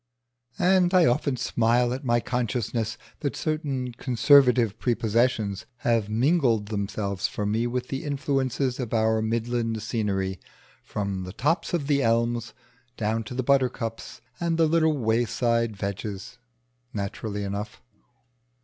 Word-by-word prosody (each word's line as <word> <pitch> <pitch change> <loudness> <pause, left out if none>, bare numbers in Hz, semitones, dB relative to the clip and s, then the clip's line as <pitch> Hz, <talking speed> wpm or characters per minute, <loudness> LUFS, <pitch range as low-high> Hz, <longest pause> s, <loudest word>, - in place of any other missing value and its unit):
And 185 0 +3
I 180 -2 +6
often 130 +1 +1
smile 120 +1 +2
at 130 - -5
my 120 -2 +2
consciousness 115 -2 -2 0.2
that 145 - -2
certain 140 -5 -2
conservative 125 -2 +4
prepossessions 110 -3 0 0.2
have 115 -3 +2
mingled 120 -3 +2
themselves 100 -2 -2
for 105 - -4
me 110 +3 0
with 125 +1 -3
the 135 - -3
influences 135 -2 -1
of 120 -3 -2
our 110 0 +2
midland 115 0 -1
scenery, 95 -5 -1 0.4
from 100 -2 -3
the 90 0 -7
tops 165 - 0
of 155 -5 -2
the 140 -1 +2
elms 115 0 0 0.4
down 110 +1 -1
to 125 - -7
the 130 - -1
buttercups 125 -4 0 0.2
and 170 -1 0
the 165 - +4
little 160 -1 +2
wayside 115 -1 +1
vetches. 100 +3 -5 0.6
Naturally 105 +1 -3
enough. 100 +2 -5
115 Hz, 130 wpm, -26 LUFS, 110-130 Hz, 0.6 s, I